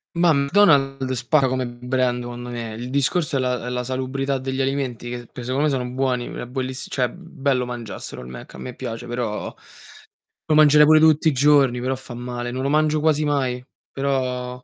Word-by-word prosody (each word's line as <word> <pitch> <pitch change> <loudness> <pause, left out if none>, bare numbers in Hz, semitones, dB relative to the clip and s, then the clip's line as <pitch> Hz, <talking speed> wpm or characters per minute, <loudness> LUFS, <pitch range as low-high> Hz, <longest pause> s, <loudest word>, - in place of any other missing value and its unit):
Ma 170 0 +4
McDonald's 140 -4 +3
spacca 135 +2 +3
come 130 0 -1
brand 125 +1 -1
secondo 120 0 -7
me, 115 -2 -5
il 120 +3 -6
discorso 140 +2 +1
è - - 0
la 125 -2 -1
è - - -3
la 125 0 -2
salubrità 130 +2 -2
degli 130 +1 -3
alimenti, 130 -3 -2
che 120 0 -5
s - - -15
che - - -7
secondo 130 +4 -1
me - - +3
sono 125 -2 -2
buoni, 125 -1 -1
uhm, - - -7
è - - -5
buellissi 130 +1 -4
cioè, 125 -2 +1
bello 140 -6 -2
mangiasselo 120 - -7
il 60 - -10
Mc, 65 -1 -10
a - - -10
me 125 - -7
piace, 115 +1 -6
però 120 -3 -3 0.9
lo 155 - +2
mangerei 150 0 +7
pure 155 +1 +6
tutti 155 0 +5
i - - +1
giorni, 135 -2 +4
però 130 +1 -1
fa 130 -1 -10
male. 120 0 -5
Non 130 +1 -3
lo 140 - 0
mangio 155 +1 +2
quasi 155 0 +2
mai, 130 -4 0 0.3
però 125 -2 -2
130 Hz, 205 wpm, -22 LUFS, 125-140 Hz, 0.9 s, mangerei